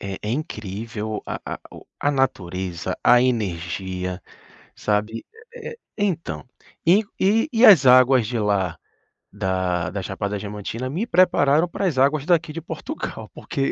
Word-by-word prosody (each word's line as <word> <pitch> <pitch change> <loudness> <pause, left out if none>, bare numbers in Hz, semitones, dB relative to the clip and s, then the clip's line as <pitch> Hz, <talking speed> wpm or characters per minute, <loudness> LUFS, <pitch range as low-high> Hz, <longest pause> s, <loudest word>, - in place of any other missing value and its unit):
É 100 -1 -5
é 105 - -3
incrível 110 - -4
a - - -4
a - - -5
o - - -13
a 145 - +2
natureza, 95 -9 -2
a 125 0 +6
energia, 95 -5 -2 0.5
sabe, 105 +2 -1 0.3
é 475 0 -7
é 465 - -12 0.2
então, 190 -5 -2 0.4
e 190 +6 +6 0.2
e 220 +8 +3
e 230 +1 +3
as 175 - +8
águas 130 -2 +6
de 120 0 -2
lá 95 -5 0 0.6
da 95 -2 -1
da 100 - -4
Chapada 100 +2 -3
Diamantina 105 +5 -5
me 185 - -2
prepararam 165 -4 +4
para 195 - -3
as 160 -7 0
águas 140 +2 +2
daqui 165 -2 +2
de 165 - -5
Portugal 160 - -6
porque 135 0 -2
115 Hz, 150 wpm, -22 LUFS, 95-155 Hz, 0.6 s, as